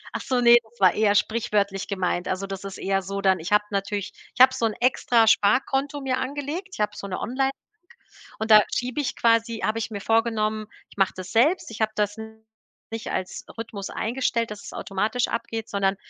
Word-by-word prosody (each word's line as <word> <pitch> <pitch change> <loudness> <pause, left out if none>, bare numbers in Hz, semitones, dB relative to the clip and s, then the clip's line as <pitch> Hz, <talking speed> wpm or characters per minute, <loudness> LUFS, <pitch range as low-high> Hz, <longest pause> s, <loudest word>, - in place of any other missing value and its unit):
Ach - - -2
so, 255 -2 0
ne, 240 0 +8
das 225 0 -25
war 185 -2 +5
eher 210 -1 +2
sprichwörtlich 205 -3 0
gemeint. 180 -2 -1
Also, 190 +1 -2
das 195 -1 -6
ist 195 -1 -7
eher 195 0 0
so 195 +2 -5
dann 190 -2 +3
ich 170 +5 -6
habe 210 0 +4
natürlich 200 0 -2 0.2
ich - - +1
habe 260 0 +8
so 230 - -1
'n 215 - -3
extra 240 -2 +3
Sparkonto 270 +6 +2
mir 260 -1 -1
angelegt. 290 +7 -4
Ich - - -9
habe 210 0 0
so 200 - -7
'ne 185 - -4
Online 265 +3 0
k - - -30 0.7
und 220 0 -3
da 215 -1 +9
schiebe 250 +4 -2
ich 255 -3 -3
quasi 230 -1 +2
habe 220 +1 0
ich 225 +1 -3
mir 200 -2 -6
vorgenommen, 220 -1 +1 0.2
ich - - -19
mache 195 - +2
das 185 0 -7
selbst. 275 +7 +2
Ich 225 - -9
habe 220 0 +1
das 210 0 -1 0.8
nicht 225 -1 -5
als 185 0 -4
Rhythmus 220 -3 -6
eingestellt, 230 -1 -1
dass 210 - -8
es - - -9
automatisch 215 +5 -1
abgeht, 230 -1 -4
sondern 195 -1 +1
220 Hz, 210 wpm, -24 LUFS, 200-240 Hz, 0.8 s, da